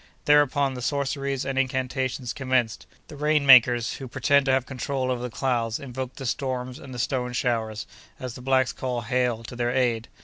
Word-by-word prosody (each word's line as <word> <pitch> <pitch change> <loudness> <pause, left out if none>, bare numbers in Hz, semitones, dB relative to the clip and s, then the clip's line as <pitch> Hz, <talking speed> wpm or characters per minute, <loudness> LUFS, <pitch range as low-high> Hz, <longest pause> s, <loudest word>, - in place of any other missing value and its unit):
Thereupon 145 -2 +3
the 125 - -6
sorceries 140 0 -2
and 135 -1 -1
incantations 130 -1 -2
commenced; 130 -5 -1 0.2
the - - -10
"rain 150 0 +1
makers," 120 -3 +6
who 135 - -7
pretend 140 +3 +2
to - - +4
have 130 -1 +2
control 130 0 -2
over 125 -1 -2
the 125 - -4
clouds, 115 -2 -1
invoked 130 -1 -6
the 135 - -6
storms 130 0 -3
and 135 - -11
the 125 - -7
"stone 125 +1 -1
showers," 115 -3 -1 0.3
as 130 -2 -5
the 125 - -10
blacks 130 0 +2
call 125 -2 -3
hail, 120 0 0
to 120 - -9
their 120 0 -1
aid. 120 -2 0
130 Hz, 190 wpm, -25 LUFS, 120-135 Hz, 0.3 s, makers